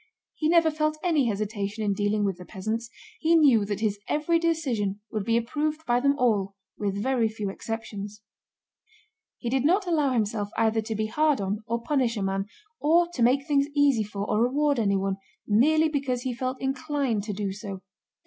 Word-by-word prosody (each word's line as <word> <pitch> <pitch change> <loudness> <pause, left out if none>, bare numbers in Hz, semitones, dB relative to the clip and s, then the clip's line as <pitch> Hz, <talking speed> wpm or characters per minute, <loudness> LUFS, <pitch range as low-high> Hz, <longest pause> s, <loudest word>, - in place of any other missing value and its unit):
He 310 - -1
never 330 -1 +5
felt 305 0 0
any 315 -8 +2
hesitation 205 0 -2
in 205 -1 +1
dealing 205 +1 0
with 195 -3 -1
the - - -8
peasants. 220 +5 -4 0.3
He 330 +1 +3
knew 265 -10 +5
that 205 0 -3
his 210 -2 0
every 320 +3 +1
decision 260 -12 -1
would 215 -3 -2
be 230 +2 +2
approved 300 +6 -2
by 240 0 +2
them 280 +2 +2
all 205 -7 +1 0.2
with 200 -1 -2
very 250 -3 +2
few 210 -2 -4
exceptions. 210 -1 -6 1.1
He 240 - -6
did 260 +2 +1
not 370 +7 +3
allow 300 -6 +1
himself 210 -3 -1
either 225 0 +2
to 220 0 -4
be 215 +1 -1
hard 300 +4 +2
on 200 +1 -2
or 235 0 -2
punish 255 -6 +1
a 200 - -1
man, 195 +1 -1 0.3
or 340 +3 +3
to 255 - -4
make 260 +4 +3
things 285 -2 +2
easy 285 -5 +4
for 205 -1 -4
or 210 - +1
reward 280 +2 +2
anyone, 195 -2 +1 0.3
merely 310 +9 +4
because 275 -5 -2
he 255 - -2
felt 255 +1 -3
inclined 270 -3 -1
to 210 - -3
do 200 0 -2
so. 195 -1 -7
235 Hz, 185 wpm, -26 LUFS, 205-290 Hz, 1.1 s, never